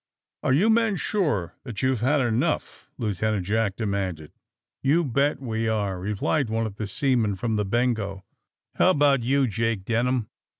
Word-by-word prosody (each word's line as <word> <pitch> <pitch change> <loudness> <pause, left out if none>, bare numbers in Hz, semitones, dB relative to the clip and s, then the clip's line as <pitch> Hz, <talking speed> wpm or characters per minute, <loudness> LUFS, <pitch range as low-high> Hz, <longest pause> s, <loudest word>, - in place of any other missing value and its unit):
*^Are 130 - +3
you 215 +7 +4
men 225 -2 +3
sure 150 - -1
that 120 -3 -6
youVe 130 -2 +2
had 135 +5 +2
enough!" 125 +6 -1
Lieutenant 105 -3 -1
Jack 105 -1 0
demanded. 95 -8 -3 0.5
'*You 150 +6 +3
bet 140 +2 +1
we 115 -3 -2
are!" 100 -4 -1
replied 105 - -1
one 115 +1 0
of 105 -2 -6
the 110 - -3
seamen 115 -2 +1
from 115 +4 -2
the 105 -2 0
^^Bengo." 110 -4 -1 0.6
*^How - - +6
about 145 -6 +4
you, 135 +3 +2
Jake 115 -3 -1
Denham?" 120 0 0
115 Hz, 160 wpm, -25 LUFS, 105-135 Hz, 0.6 s, ^How